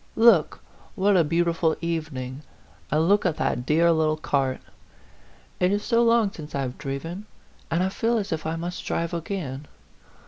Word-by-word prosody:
" - - -33 0.2
Look, 165 -8 -1 0.3
what 200 +1 +3
a 175 - +5
beau 165 +3 +1
tiful 165 -1 +1
evening 150 -6 -4 0.5
and 155 +2 +2
look 205 +2 +4
at 175 -5 0
that 125 0 -1
dear 165 +2 +4
little 155 -1 +2
cart! 135 -4 0 1.0
It 180 +1 +3
is 205 +1 0
so 230 +1 +2
long 230 -3 +3
since 155 -6 -9
I 140 - 0
have 125 -2 -5
driven, 165 +9 -5 0.4
and 170 +2 +1
I 190 - +1
feel 230 +4 0
as 205 -2 -3
if 160 0 -4
I 160 - -1
must 175 +2 -5
drive 170 +1 -2
again. 160 -5 -4
165 Hz, 180 wpm, -25 LUFS, 150-190 Hz, 1.0 s, a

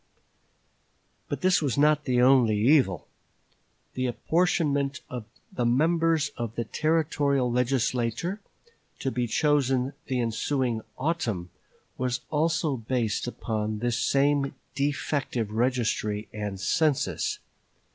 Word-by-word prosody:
But - - -3
this 185 -2 +3
was 140 -7 -1
not 150 +1 +3
the 125 -2 +3
only 125 -5 +5
evil. 115 - +3 0.9
The 130 0 -1
apportionment 145 -1 0
of 125 -4 -5 0.3
the 125 - -1
members 160 +4 +2
of 115 -2 -4
the 120 - -1
Territorial 145 -2 +1
Legislature 125 - 0 0.6
to 135 - -2
be 125 -1 -1
chosen 135 0 +1
the 130 -1 -1
ensuing 120 +1 -1 0.2
autumn 115 - -2 0.5
was 125 -1 -1
also 160 -2 +1
based 115 -1 -1
upon 110 -3 -3
this 120 +1 -1
same 140 0 +2 0.2
defective 140 -5 -1
registry 110 -3 0
and 105 -2 -4
census. 150 +8 +1
130 Hz, 105 wpm, -27 LUFS, 115-145 Hz, 0.9 s, only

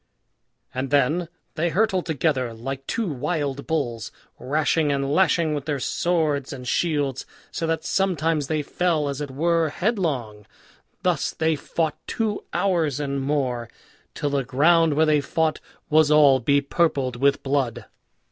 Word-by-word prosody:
And 130 +1 -3
then 150 +5 +2 0.2
they 170 +2 0
hurtled 190 0 +1
together 135 -6 0
like 135 +4 -6
two 230 -3 -1
wild 140 -1 -2
bulls, 120 -9 -2 0.3
rashing 150 +3 +1
and 140 0 -1
lashing 170 -3 +3
with 145 -2 -3
their 145 -3 -2
swords 155 -3 0
and 125 -2 -7
shields, 145 -3 0 0.3
so 165 - -3
that 165 0 -1
sometimes 165 -6 0
they 155 -1 -1
fell, 160 -1 0
as 140 0 -4
it 145 - -4
were, 165 +3 +1
headlong. 145 - -2 0.6
Thus - - +1
they 160 0 +1
fought 155 +1 -2
two 220 -2 -2
hours 165 -8 0
and 140 -1 -2
more, 130 -5 -1 0.5
till 145 - -2
the 140 -1 0
ground 155 +5 +3
where 160 +2 +4
they 150 -1 +3
fought 155 +2 0 0.3
was 155 0 +4
all 145 -3 +6
bepurpled 140 0 +1
with 140 +2 +2
blood. 135 -4 -1
150 Hz, 145 wpm, -24 LUFS, 135-165 Hz, 0.6 s, all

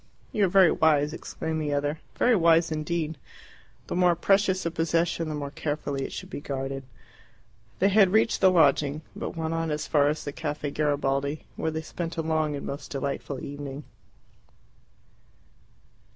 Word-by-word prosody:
"You 210 -2 +2
are - - 0
very 190 -2 +6
wise," 150 -1 +3
exclaimed 160 -1 -4
the 145 -1 -1
other; 145 +2 -1 0.2
"very 245 -1 +4
wise 165 -2 +4
indeed. 155 0 -2 0.7
The - - -4
more 180 -1 +4
precious 190 +1 +2
a 170 - 0
possession 165 0 0
the 155 - -3
more 140 -1 -4
carefully 145 -2 -3
it - - -7
should - - -7
be - - -5
guarded." 135 -1 -4 0.9
They 195 - +3
had 200 -1 +5
reached 220 +2 +2
the 190 - +7
lodging, 150 -3 +3
but - - -5
went 160 0 -2
on 165 0 -1
as 150 0 -2
far 145 -2 +3
as 150 - -2
the 145 - -3
Caffe 150 -1 -4
Garibaldi, 145 -1 0
where 160 - -1
they 160 0 -4
spent 165 +1 -5
a 165 - 0
long 155 -2 0
and 140 - -6
most 140 +1 -6
delightful 140 -1 -4
evening. 140 0 -6
155 Hz, 165 wpm, -27 LUFS, 145-170 Hz, 0.9 s, the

